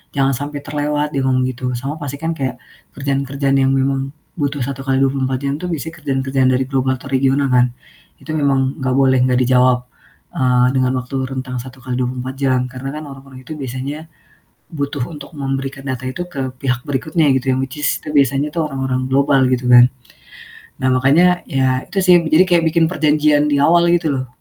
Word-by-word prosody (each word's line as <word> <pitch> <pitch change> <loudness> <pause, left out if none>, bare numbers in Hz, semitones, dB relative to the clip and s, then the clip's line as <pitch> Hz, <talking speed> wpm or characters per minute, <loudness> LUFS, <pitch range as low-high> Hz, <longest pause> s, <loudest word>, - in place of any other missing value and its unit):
jangan 135 -1 +2
sampai 145 +3 -4
terlewat," 150 0 -2
dia 135 - 0
ngomong 130 -1 +2
gitu, 130 0 -3
sama 135 +5 -4
pasti 140 -1 -5
kan 165 +2 -2
kayak 130 -5 -3 0.4
kerjaan-kerjaan 140 0 -1
yang 135 - +3
memang 135 0 0 0.3
butuh 145 -1 -1
1 135 0 -5
kali 135 0 0
24 135 -1 0
jam 140 - 0
itu 180 - -3
bisa 160 -2 -4
kerjaan-kerjaan 135 -3 0
dari 130 +1 +1
global 130 -1 0
atau 140 - -11
regional 135 +1 +2
kan, 125 0 +4 0.5
itu 155 - -7
memang 135 -1 +1
gak 130 -1 0
boleh 130 -1 +4
gak 125 - +2
dijawab, 125 0 +3 0.5
eee, 125 -1 +3
dengan 130 -1 +2
waktu 125 +2 -6
rentang 130 -1 -5
1 130 +1 -12
kali 125 -1 -3
24 130 +1 -3
jam. 130 -2 +2
Karena 130 +1 -6
kan, 155 - -6
orang-orang 135 -1 -12
itu 160 - -7
biasanya 135 +4 -5 0.7
butuh 140 -3 -3
untuk 145 -1 -10
memberikan 135 0 -4
data 130 -1 -4
itu 175 +7 -4
ke 135 -2 -3
pihak 125 -2 -1
berikutnya 155 +3 +1
gitu, 130 0 0
yang 130 - -1
which 135 +2 -9
is 145 - 0
itu - - -10
biasanya 140 +1 +2
orang-orang 135 -4 -1
global, 140 0 +3
gitu 125 -1 0
kan. 125 0 +8 0.9
Nah 130 - +2
makanya, 160 +8 +3
ya 130 -1 0
itu 200 - -3
sih, 180 -1 +6
eee, 165 - -3
jadi 170 +4 +6
kayak 175 -2 +4
bikin 170 -1 +3
perjanjian 150 -2 +2
di 145 - +2
awal 170 +3 +4
gitu 165 -3 +1
loh, 130 -1 -3
135 Hz, 190 wpm, -18 LUFS, 130-145 Hz, 0.9 s, kan